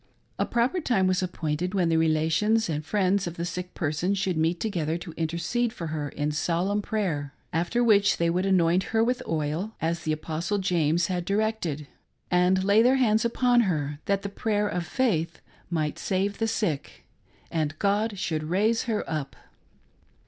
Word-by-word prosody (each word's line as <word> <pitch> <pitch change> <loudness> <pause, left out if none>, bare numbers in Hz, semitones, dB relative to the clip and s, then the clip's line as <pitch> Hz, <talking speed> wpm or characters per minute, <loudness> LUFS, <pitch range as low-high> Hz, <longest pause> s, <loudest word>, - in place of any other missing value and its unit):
A - - +1
proper 250 +10 +1
time 220 -10 +2
was 185 0 +2
appointed 180 0 -2
when 180 -3 +2
the 165 - +3
relations 160 +8 +2
and 150 -1 -2
friends 195 +2 +1
of 170 - -5
the 170 - -2
sick 180 +1 -5
person 165 +5 0
should 190 -2 -1
meet 165 +2 +1
together 170 -7 -1
to 170 0 -8
intercede 170 +9 -1
for 170 - -6
her 150 -2 -3
in 145 +2 -2
solemn 175 +7 0
prayer, 165 -11 -2 0.2
after 175 +9 +1
which 205 -3 +4
they 170 - +1
would 180 +3 +1
anoint 180 -1 +3
her 225 - +5
with 250 +2 0
oil, 160 +7 -2
as 165 +1 -1
the 155 - -2
Apostle 160 +5 -2
James 170 -3 +1
had 180 -1 -2
directed, 200 -7 -1 0.5
and 180 +1 +3
lay 200 +3 +5
their 250 +3 +5
hands 220 -4 +3
upon 245 +1 +3
her, 150 -8 -1
that 200 0 0
the 200 - -3
prayer 210 0 0
of 175 -3 -3
faith 170 -9 0 0.3
might 155 -3 -1
save 200 +1 -1
the 225 - +1
sick, 210 -10 -2 0.5
and 155 -2 -1
God 205 +2 0
should 155 -3 -2
raise 210 +7 +1
her 220 -4 -2
up. 150 -4 -4
180 Hz, 175 wpm, -26 LUFS, 160-210 Hz, 0.5 s, her